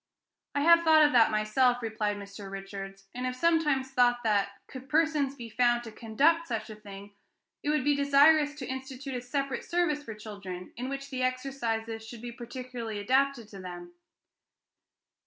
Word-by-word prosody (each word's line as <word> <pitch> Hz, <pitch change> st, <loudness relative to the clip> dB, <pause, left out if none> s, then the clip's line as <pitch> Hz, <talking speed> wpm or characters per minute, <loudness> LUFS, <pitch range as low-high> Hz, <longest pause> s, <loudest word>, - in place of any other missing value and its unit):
"I 285 Hz, -, +2 dB
have 335 Hz, +2 st, +7 dB
thought 315 Hz, -2 st, +6 dB
of 295 Hz, -, +3 dB
that 235 Hz, -4 st, +6 dB
myself," 240 Hz, +4 st, +2 dB
replied 215 Hz, -2 st, -1 dB
Mr. 200 Hz, 0 st, -9 dB
Richards, 195 Hz, 0 st, -8 dB
"and 250 Hz, +1 st, -3 dB
have 250 Hz, -, -3 dB
sometimes 295 Hz, -3 st, +2 dB
thought 245 Hz, -2 st, +3 dB
that, 205 Hz, -3 st, +2 dB, 0.2 s
could 260 Hz, 0 st, -11 dB
persons 300 Hz, -3 st, +2 dB
be 235 Hz, -3 st, -8 dB
found 240 Hz, +1 st, +2 dB
to 225 Hz, -, -8 dB
conduct 290 Hz, +10 st, +2 dB
such 220 Hz, -2 st, -3 dB
a -, -, -8 dB
thing, 200 Hz, -1 st, -11 dB, 0.5 s
it 290 Hz, -, -2 dB
would 300 Hz, -3 st, +2 dB
be 290 Hz, +1 st, +3 dB
desirable 290 Hz, +2 st, +5 dB
to 280 Hz, -3 st, -6 dB
institute 265 Hz, +1 st, -6 dB
a 250 Hz, -, -3 dB
separate 275 Hz, +2 st, -2 dB
service 345 Hz, -4 st, 0 dB
for 225 Hz, -7 st, -8 dB
children, 200 Hz, -4 st, -8 dB
in 250 Hz, +3 st, -4 dB
which 275 Hz, 0 st, -6 dB
the 260 Hz, -1 st, -3 dB
exercises 235 Hz, -4 st, -2 dB
should 225 Hz, +1 st, -10 dB
be 240 Hz, -, -5 dB
particularly 240 Hz, -2 st, -6 dB
adapted 260 Hz, +2 st, +1 dB
to 195 Hz, -, -10 dB
them." 175 Hz, -1 st, -8 dB
250 Hz, 175 wpm, -29 LUFS, 215-275 Hz, 0.5 s, have